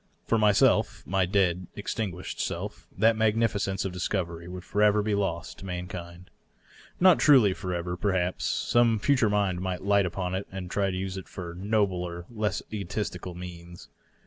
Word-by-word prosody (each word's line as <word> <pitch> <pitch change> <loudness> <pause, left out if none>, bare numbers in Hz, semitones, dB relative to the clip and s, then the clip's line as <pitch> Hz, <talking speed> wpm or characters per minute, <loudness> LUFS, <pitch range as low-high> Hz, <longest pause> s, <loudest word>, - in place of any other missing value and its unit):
For 115 - +2
myself 105 -2 +3
— - - -33
my 95 0 +1
dead, 90 -2 +1
extin 105 0 -2
guished 90 +1 -7
self - - -4
— - - -26
that 110 +3 +4
magnificence 105 -3 +1
of 95 - -2
discovery 85 -2 -3
would 90 0 -7
forever 105 +1 +3
be 105 0 0
lost 95 -5 -2
to - - -9
mankind. 90 0 -7 0.7
Not 185 -1 +6
truly 125 -10 +6
forever, 90 -1 -3
perhaps; 90 -1 0
some 115 -2 +2
ftiture 125 -1 +3
mind 100 -3 +1
might 95 -1 -3
light 100 -1 +3
upon 90 0 -3
it 95 +2 -3
and 95 -2 -6 0.2
use 95 0 -3
it 95 - -7
to 85 -2 -5
nobler, 90 -3 -1
less 110 -2 -2
egotistic 100 -2 -4
ends. 85 -1 -9
95 Hz, 160 wpm, -27 LUFS, 90-105 Hz, 0.7 s, Not